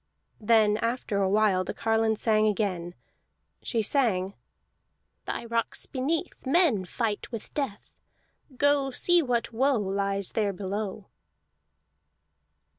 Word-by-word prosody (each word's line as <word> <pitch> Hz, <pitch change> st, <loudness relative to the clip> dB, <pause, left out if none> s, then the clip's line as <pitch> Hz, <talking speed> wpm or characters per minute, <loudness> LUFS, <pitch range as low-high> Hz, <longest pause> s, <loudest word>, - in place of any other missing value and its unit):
Then 215 Hz, -1 st, +4 dB
after 230 Hz, -3 st, -1 dB
a 190 Hz, -, +2 dB
while 200 Hz, -2 st, +3 dB
the 185 Hz, -, -5 dB
carline 225 Hz, 0 st, +1 dB
sang 215 Hz, 0 st, +2 dB
again. 185 Hz, -4 st, -1 dB, 0.7 s
She 225 Hz, -2 st, -1 dB
sang: 200 Hz, -7 st, +1 dB, 0.9 s
"Thy -, -, -4 dB
rocks 230 Hz, 0 st, -2 dB
beneath, 305 Hz, +6 st, -3 dB
Men 270 Hz, -, +3 dB
fight 215 Hz, +3 st, -3 dB
with 230 Hz, -3 st, -7 dB
death. 265 Hz, -9 st, -4 dB, 0.7 s
Go, 285 Hz, -1 st, +3 dB
see 350 Hz, +6 st, +3 dB
what 240 Hz, -4 st, -1 dB
woe 265 Hz, +4 st, +2 dB
Lies 195 Hz, -1 st, -1 dB
there 205 Hz, -2 st, 0 dB
below!" 200 Hz, +1 st, -4 dB
220 Hz, 115 wpm, -27 LUFS, 200-250 Hz, 0.9 s, Then